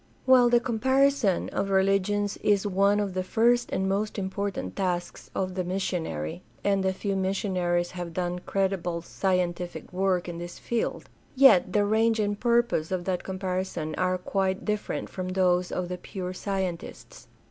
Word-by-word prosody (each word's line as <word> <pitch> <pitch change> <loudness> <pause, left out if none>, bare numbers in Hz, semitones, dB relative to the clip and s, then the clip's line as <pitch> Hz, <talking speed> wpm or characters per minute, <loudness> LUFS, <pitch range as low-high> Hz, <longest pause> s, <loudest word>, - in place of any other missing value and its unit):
While 255 -2 +6
the 240 0 +5
comparison 260 -2 +2
of 195 - -2
religions 195 +1 +2
is 205 -1 +2
one 200 +1 +3
of 200 -2 -2
the 185 - -1
first 235 +5 +2
and 190 - 0
most 205 +3 -1
important 190 - -3
tasks 175 -2 -3
of 185 -1 -1
the 185 0 -2
missionary 175 - -3 0.2
(and 195 -1 +2
a 190 - +2
few 195 +1 -3
mis 190 0 0
sionaries 175 -3 0
have 175 -2 -6
done 180 -1 -1
creditable 180 -3 -1
scientific 180 -1 -2
work 185 -1 +1
in 170 -1 -5
this 175 0 -7
field), 235 -1 -2 0.3
yet 255 -9 +6
the 205 -1 +3
range 220 +2 +2
and 205 -1 0
purpose 235 -9 +1
of 180 -2 -2
that 185 -2 -1
comparison 185 -4 -3
are 185 +2 0
quite 190 +1 -1
different 210 -1 -2
from 185 -1 -5
those 180 -1 +2
of 180 -1 -2
the 180 0 -5
pure 185 -1 -5
scientists. 190 -3 -5
190 Hz, 160 wpm, -27 LUFS, 180-205 Hz, 0.3 s, While